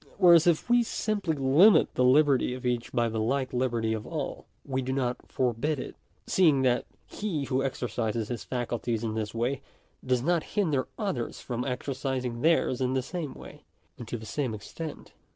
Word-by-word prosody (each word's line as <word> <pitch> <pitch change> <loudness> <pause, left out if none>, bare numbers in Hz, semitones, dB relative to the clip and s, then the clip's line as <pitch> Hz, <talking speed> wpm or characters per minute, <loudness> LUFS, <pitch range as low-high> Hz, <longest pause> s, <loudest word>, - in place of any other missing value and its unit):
Whereas 175 -4 +7
if 170 -3 +2
we 240 0 +5
simply 210 -7 -1
limit 145 +10 +5
the 125 - +1
liberty 130 -1 +4
of 130 0 -9
each 120 -1 -1
by 120 -2 +1
the 110 -1 -2
like 130 +4 -1
liberty 120 -3 0
of 110 -1 -5
all, - - -5 0.2
we 130 -1 -1
do 130 0 -3
not 125 -2 0
forbid 130 +4 0
it; - - -7 0.3
seeing 155 -8 +4
that 125 -2 +2 0.2
he 185 -9 -3
who 135 -1 0
exercises 115 -4 -2
his 120 -3 -4
faculties 120 -2 -2
in 110 -1 -2
this 110 0 -3
way, 125 +4 -1 0.4
does 125 -1 +1
not 170 +2 +2 0.2
hinder 155 -10 +1
others 195 - -3
from 125 -1 -4
exercising 130 -2 -3
theirs 155 -5 +2
in 130 0 +1
the 130 - 0
same 165 0 -5
way, - - -12 0.4
and 120 - -8
to 120 - -3
the 110 - -10
same 125 0 -2
extent. 150 +9 -8
130 Hz, 180 wpm, -28 LUFS, 120-150 Hz, 0.4 s, Whereas